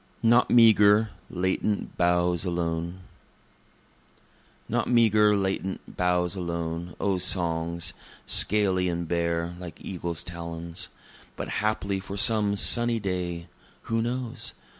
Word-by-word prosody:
Not 120 Hz, +2 st, +4 dB
Meagre, 110 Hz, -2 st, +5 dB, 0.2 s
Latent 95 Hz, +3 st, -2 dB
Boughs 90 Hz, 0 st, +1 dB
Alone 85 Hz, 0 st, -3 dB, 1.7 s
Not -, -, -1 dB
meagre, 110 Hz, -3 st, +3 dB
latent 95 Hz, -1 st, -4 dB
boughs 90 Hz, +1 st, 0 dB
alone, 85 Hz, -1 st, -5 dB
O 95 Hz, -2 st, 0 dB
songs! 85 Hz, -2 st, 0 dB, 0.3 s
(scaly 95 Hz, -4 st, +3 dB
and 85 Hz, -1 st, -4 dB
bare, 85 Hz, 0 st, -2 dB
like 85 Hz, -4 st, -9 dB
eagles' 85 Hz, -3 st, -4 dB
talons,) 85 Hz, +2 st, -6 dB, 0.5 s
But -, -, -6 dB
haply 100 Hz, -2 st, -1 dB
for 100 Hz, +1 st, -8 dB
some 105 Hz, -1 st, +4 dB
sunny 120 Hz, +2 st, +4 dB
day 90 Hz, -3 st, -4 dB, 0.4 s
(who 115 Hz, 0 st, -1 dB
knows?) 120 Hz, 0 st, -4 dB
90 Hz, 105 wpm, -26 LUFS, 85-105 Hz, 1.7 s, Meagre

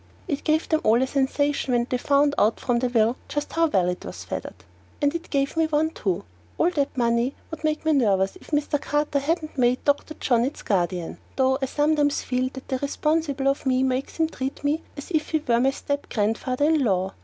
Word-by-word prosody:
It 285 Hz, -5 st, -2 dB
gave 315 Hz, +1 st, +1 dB
them 315 Hz, 0 st, +1 dB
all 225 Hz, +2 st, +4 dB
a -, -, +2 dB
sensation 275 Hz, 0 st, 0 dB
when 240 Hz, 0 st, +2 dB
they 250 Hz, -, -1 dB
found 285 Hz, +2 st, +3 dB
out 215 Hz, +2 st, +3 dB
from 245 Hz, -2 st, +1 dB
the 250 Hz, 0 st, 0 dB
will 230 Hz, 0 st, +2 dB
just 290 Hz, 0 st, -3 dB
how 330 Hz, 0 st, +3 dB
well 190 Hz, -, +2 dB
it 180 Hz, 0 st, -3 dB
was -, -, -7 dB
feathered. -, -, -5 dB, 0.4 s
And 285 Hz, 0 st, +2 dB
it 335 Hz, 0 st, -5 dB
gave 275 Hz, 0 st, 0 dB
me 325 Hz, -1 st, +2 dB
one 310 Hz, +1 st, +1 dB
too. 190 Hz, -, -2 dB, 0.3 s
All 350 Hz, -, +3 dB
that 285 Hz, -5 st, -1 dB
money 235 Hz, +2 st, +1 dB, 0.2 s
would 320 Hz, 0 st, -7 dB
make 310 Hz, 0 st, -1 dB
me 315 Hz, -, +3 dB
nervous 195 Hz, -8 st, +2 dB
if -, -, -18 dB
Mr. 295 Hz, -1 st, 0 dB
Carter 295 Hz, -1 st, 0 dB
hadn't 310 Hz, 0 st, -2 dB
made 245 Hz, 0 st, +2 dB
Dr. 290 Hz, +2 st, +1 dB
John 240 Hz, -4 st, +2 dB
its 270 Hz, +4 st, -4 dB
guardian, 180 Hz, -3 st, -1 dB, 0.2 s
though 265 Hz, 0 st, +2 dB
I 270 Hz, -, 0 dB
sometimes 295 Hz, +1 st, +1 dB
feel 255 Hz, 0 st, 0 dB
that 265 Hz, -, -9 dB
the 260 Hz, -2 st, -1 dB
responsibility 285 Hz, -1 st, 0 dB
of -, -, -7 dB
me 260 Hz, 0 st, +3 dB
makes 260 Hz, +1 st, -1 dB
him 325 Hz, -1 st, +2 dB
treat 270 Hz, -3 st, -5 dB
me 295 Hz, +3 st, +1 dB, 0.2 s
as 285 Hz, -, -8 dB
if 315 Hz, -3 st, 0 dB
he 315 Hz, -2 st, 0 dB
were 235 Hz, -1 st, +3 dB
my 260 Hz, +2 st, +4 dB
step 285 Hz, +1 st, -3 dB
grandfather 225 Hz, +6 st, 0 dB
in 310 Hz, -2 st, +3 dB
law. 190 Hz, -3 st, 0 dB
275 Hz, 220 wpm, -24 LUFS, 245-300 Hz, 0.4 s, all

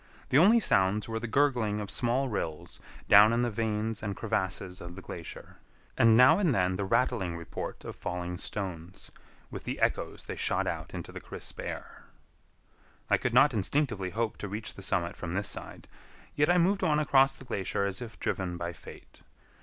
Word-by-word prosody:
The 130 Hz, -, +4 dB
only 215 Hz, +8 st, +6 dB
sounds 100 Hz, -, +2 dB
were 115 Hz, 0 st, -3 dB
the 120 Hz, -, -4 dB
gurgling 120 Hz, -5 st, +1 dB
of 105 Hz, -1 st, -5 dB
small 125 Hz, +3 st, 0 dB
rills 80 Hz, -9 st, -4 dB, 0.3 s
down 105 Hz, +2 st, +8 dB
in 120 Hz, +1 st, +2 dB
the 120 Hz, -, 0 dB
veins 110 Hz, 0 st, -2 dB
and 105 Hz, -2 st, -3 dB
crevasses 95 Hz, -4 st, -2 dB
of 85 Hz, 0 st, -8 dB
the 95 Hz, -, -9 dB
glacier, 85 Hz, -2 st, -9 dB, 0.4 s
and 115 Hz, -1 st, +5 dB
now 130 Hz, +9 st, +7 dB
and 170 Hz, -11 st, +2 dB
then 90 Hz, -2 st, +1 dB
the 100 Hz, +1 st, -2 dB
rattling 110 Hz, -6 st, 0 dB
report 85 Hz, -, -7 dB
of -, -, -6 dB
falling 90 Hz, 0 st, -4 dB
stones, 90 Hz, -3 st, -5 dB, 0.4 s
with -, -, -7 dB
the -, -, -4 dB
echoes -, -, -1 dB
they -, -, -6 dB
shot -, -, +1 dB
out -, -, -4 dB
into -, -, -6 dB
the -, -, -8 dB
crisp -, -, -8 dB
air. -, -, -7 dB, 1.1 s
I -, -, +6 dB
could 125 Hz, -1 st, -2 dB
not 135 Hz, +3 st, +7 dB
distinctly 110 Hz, -3 st, 0 dB
hope 110 Hz, +4 st, -2 dB
to 105 Hz, -, -5 dB
reach 105 Hz, +3 st, -5 dB
the -, -, -11 dB
summit 90 Hz, -3 st, -1 dB
from 85 Hz, 0 st, -5 dB
this 100 Hz, +1 st, -1 dB
side, -, -, -8 dB, 0.5 s
yet 145 Hz, +2 st, +2 dB
I 175 Hz, -, +5 dB
moved 190 Hz, +3 st, +2 dB
on 150 Hz, -, +3 dB
across 135 Hz, -2 st, +4 dB
the 135 Hz, -, -12 dB
glacier 100 Hz, -3 st, -1 dB
as 100 Hz, +3 st, -4 dB
if 115 Hz, -3 st, -8 dB
driven 90 Hz, -2 st, -2 dB
by 85 Hz, 0 st, -4 dB
fate. -, -, -14 dB
105 Hz, 190 wpm, -29 LUFS, 95-125 Hz, 1.1 s, down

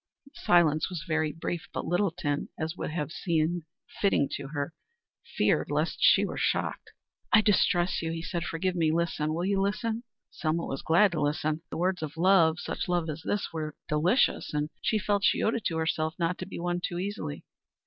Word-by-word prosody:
The 275 Hz, -, -18 dB
silence 160 Hz, -3 st, +3 dB
was 175 Hz, -4 st, -5 dB
very 160 Hz, -1 st, +1 dB
brief, 165 Hz, +2 st, -4 dB
but -, -, -4 dB
Littleton, 175 Hz, -4 st, 0 dB
as 160 Hz, +1 st, -3 dB
would -, -, -4 dB
have 155 Hz, -2 st, -3 dB
seemed 170 Hz, -1 st, 0 dB, 0.4 s
fitting 195 Hz, -8 st, +3 dB
to 135 Hz, -, -4 dB
her, 145 Hz, +2 st, -3 dB, 0.6 s
feared -, -, +2 dB
lest -, -, 0 dB
she -, -, +6 dB
were -, -, -4 dB
shocked. -, -, -1 dB, 0.4 s
"I 215 Hz, -, +7 dB
distress 190 Hz, -4 st, +2 dB
you," 165 Hz, -1 st, -2 dB
he 165 Hz, 0 st, -4 dB
said. 170 Hz, 0 st, -3 dB
"Forgive 180 Hz, +2 st, -1 dB
me. 165 Hz, -3 st, +2 dB
Listen 160 Hz, -2 st, 0 dB
will 175 Hz, +2 st, -1 dB
you 195 Hz, 0 st, +1 dB
listen?" 220 Hz, +3 st, -1 dB, 0.3 s
Selma 165 Hz, +1 st, -1 dB
was 135 Hz, -, -4 dB
glad 180 Hz, +5 st, +4 dB
to 155 Hz, -4 st, -2 dB
listen. 150 Hz, +1 st, 0 dB
The -, -, -5 dB
words 180 Hz, +1 st, 0 dB
of 155 Hz, -1 st, -5 dB
love, 170 Hz, -3 st, +5 dB
such 175 Hz, -, -4 dB
love 175 Hz, -3 st, 0 dB
as 150 Hz, +2 st, -7 dB
this, 205 Hz, -1 st, -1 dB
were 155 Hz, -2 st, -4 dB
delicious, 155 Hz, -, +2 dB
and 150 Hz, +1 st, -1 dB
she 220 Hz, -, +1 dB
felt 205 Hz, 0 st, 0 dB
she -, -, +3 dB
owed 220 Hz, -, +2 dB
it 230 Hz, -, -3 dB
to 165 Hz, -, 0 dB
herself 160 Hz, 0 st, 0 dB
not 170 Hz, 0 st, -1 dB
to 185 Hz, -, -5 dB
be -, -, -7 dB
won 175 Hz, 0 st, -1 dB
too 175 Hz, -, -2 dB
easily. 185 Hz, -, -4 dB
170 Hz, 200 wpm, -28 LUFS, 155-185 Hz, 0.6 s, I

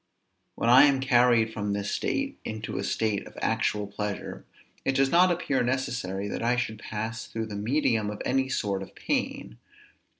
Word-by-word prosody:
When -, -, -1 dB
I 130 Hz, +4 st, +8 dB
am 140 Hz, -2 st, +3 dB
carried 120 Hz, -4 st, +3 dB
from 105 Hz, -2 st, -2 dB
this 100 Hz, 0 st, -2 dB
state 275 Hz, 0 st, -2 dB
into 110 Hz, 0 st, -4 dB
a -, -, -2 dB
state 110 Hz, -3 st, -1 dB
of -, -, -15 dB
actual 105 Hz, -1 st, 0 dB
pleasure, 100 Hz, 0 st, -5 dB, 0.4 s
it 135 Hz, -, +1 dB
does 135 Hz, 0 st, +3 dB
not 180 Hz, +2 st, +6 dB
appear 170 Hz, -6 st, 0 dB
necessary 120 Hz, -6 st, -2 dB
that -, -, -4 dB
I 120 Hz, +2 st, +2 dB
should 110 Hz, -3 st, -2 dB
pass 110 Hz, +2 st, -5 dB
through 115 Hz, 0 st, -4 dB
the 105 Hz, -2 st, -7 dB
medium 110 Hz, -1 st, +1 dB
of 105 Hz, -, -6 dB
any 130 Hz, +1 st, +1 dB
sort 100 Hz, -6 st, -1 dB
of 95 Hz, -, -10 dB
pain. -, -, -3 dB
115 Hz, 175 wpm, -27 LUFS, 105-130 Hz, 0.4 s, I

